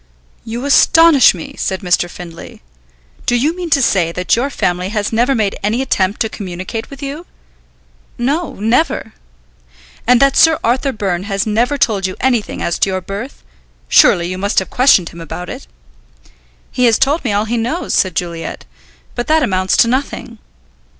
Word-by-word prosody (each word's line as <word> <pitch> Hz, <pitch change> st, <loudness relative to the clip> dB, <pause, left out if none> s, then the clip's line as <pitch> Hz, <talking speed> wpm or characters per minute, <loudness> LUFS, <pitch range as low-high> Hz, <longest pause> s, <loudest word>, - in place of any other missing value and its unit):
"You 235 Hz, +4 st, -5 dB
astonish 300 Hz, -, +5 dB
me," 165 Hz, -, -8 dB
said 190 Hz, -1 st, -2 dB
Mr. 175 Hz, -1 st, +1 dB
Findlay. 170 Hz, -, -11 dB, 0.6 s
"Do 245 Hz, -, +2 dB
you 290 Hz, +8 st, +1 dB
mean 360 Hz, -2 st, -5 dB
to 280 Hz, -3 st, +3 dB
say 175 Hz, -7 st, +2 dB
that 180 Hz, +1 st, 0 dB
your 255 Hz, +4 st, -1 dB
family 180 Hz, -7 st, -2 dB
has 210 Hz, 0 st, -2 dB
never 245 Hz, +4 st, +2 dB
made 210 Hz, -4 st, 0 dB
any 215 Hz, +4 st, 0 dB
attempt 195 Hz, -5 st, -1 dB
to 220 Hz, -, +2 dB
communicate 190 Hz, +1 st, -6 dB
with 275 Hz, 0 st, -10 dB
you?" 290 Hz, +5 st, -6 dB, 0.9 s
"No, 290 Hz, +8 st, -2 dB
never." 235 Hz, +10 st, 0 dB, 0.9 s
"And 250 Hz, 0 st, +5 dB
that 275 Hz, 0 st, +3 dB
Sir 325 Hz, -1 st, +5 dB
Arthur 260 Hz, +4 st, +1 dB
Byrne 195 Hz, -5 st, -3 dB
has 195 Hz, -1 st, -1 dB
never 235 Hz, +6 st, 0 dB
told 200 Hz, -7 st, +1 dB
you 185 Hz, -, -6 dB
anything 240 Hz, -5 st, -1 dB
as 170 Hz, -, -2 dB
to -, -, +2 dB
your 185 Hz, 0 st, -2 dB
birth? 200 Hz, +8 st, -7 dB, 0.4 s
Surely 170 Hz, -, +5 dB
you 185 Hz, +1 st, -5 dB
must 200 Hz, +2 st, -2 dB
have 190 Hz, -, +1 dB
questioned 245 Hz, -9 st, +4 dB
him 170 Hz, -, -11 dB
about 175 Hz, +2 st, -7 dB
it?" -, -, -9 dB, 1.0 s
"He 250 Hz, -, +1 dB
has 230 Hz, -2 st, +4 dB
told 290 Hz, +4 st, +1 dB
me 240 Hz, -, -1 dB
all 205 Hz, +1 st, 0 dB
he 230 Hz, +2 st, -2 dB
knows," 245 Hz, +10 st, -2 dB
said 185 Hz, -3 st, +1 dB
Juliet, 170 Hz, -2 st, -5 dB, 0.5 s
"but 240 Hz, -, -4 dB
that 315 Hz, 0 st, +3 dB
amounts 185 Hz, -5 st, 0 dB
to 235 Hz, -, +5 dB
nothing." 245 Hz, -2 st, -3 dB
225 Hz, 175 wpm, -16 LUFS, 185-265 Hz, 1.0 s, astonish